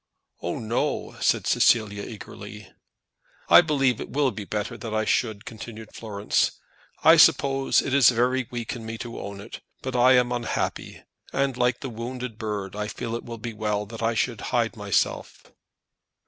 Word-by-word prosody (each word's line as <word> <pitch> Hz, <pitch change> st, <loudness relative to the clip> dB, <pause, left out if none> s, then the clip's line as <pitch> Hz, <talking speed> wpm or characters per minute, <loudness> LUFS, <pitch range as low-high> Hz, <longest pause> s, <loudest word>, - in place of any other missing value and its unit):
"Oh, 85 Hz, -, -3 dB
no," 115 Hz, +1 st, -2 dB
said -, -, +2 dB
Cecilia, 105 Hz, -3 st, +3 dB
eagerly. 105 Hz, -1 st, -9 dB, 0.8 s
"I -, -, +10 dB
believe 135 Hz, -7 st, +1 dB
it -, -, -6 dB
will 140 Hz, 0 st, +1 dB
be 105 Hz, -1 st, -7 dB
better 105 Hz, +4 st, -3 dB
that 110 Hz, -1 st, -5 dB
I 110 Hz, 0 st, +1 dB
should," 110 Hz, -3 st, 0 dB
continued 110 Hz, 0 st, -9 dB
Florence. 105 Hz, -2 st, 0 dB, 0.5 s
"I 165 Hz, +1 st, +8 dB
suppose 135 Hz, -4 st, +4 dB
it 130 Hz, -, -3 dB
is 140 Hz, -4 st, +7 dB
very 125 Hz, +1 st, +1 dB
weak 120 Hz, -1 st, -4 dB
in 115 Hz, -, -8 dB
me 115 Hz, 0 st, -5 dB
to 120 Hz, 0 st, -7 dB
own 100 Hz, 0 st, -7 dB
it; 105 Hz, +4 st, -9 dB, 0.2 s
but 130 Hz, -1 st, -4 dB
I 125 Hz, +1 st, +6 dB
am 125 Hz, -1 st, +3 dB
unhappy, 120 Hz, -2 st, -3 dB, 0.3 s
and, 135 Hz, -1 st, 0 dB
like 125 Hz, 0 st, +1 dB
the 135 Hz, -, -4 dB
wounded 120 Hz, 0 st, -6 dB
bird, 105 Hz, -4 st, -4 dB
I 105 Hz, 0 st, -3 dB
feel 115 Hz, -, -5 dB
that 115 Hz, -, -1 dB
it -, -, -14 dB
will 115 Hz, -1 st, -7 dB
be 115 Hz, +1 st, -6 dB
well 105 Hz, -1 st, -1 dB
that 115 Hz, +2 st, -9 dB
I 115 Hz, 0 st, +1 dB
should -, -, -1 dB
hide -, -, 0 dB
myself." -, -, -1 dB
115 Hz, 175 wpm, -25 LUFS, 105-125 Hz, 0.8 s, I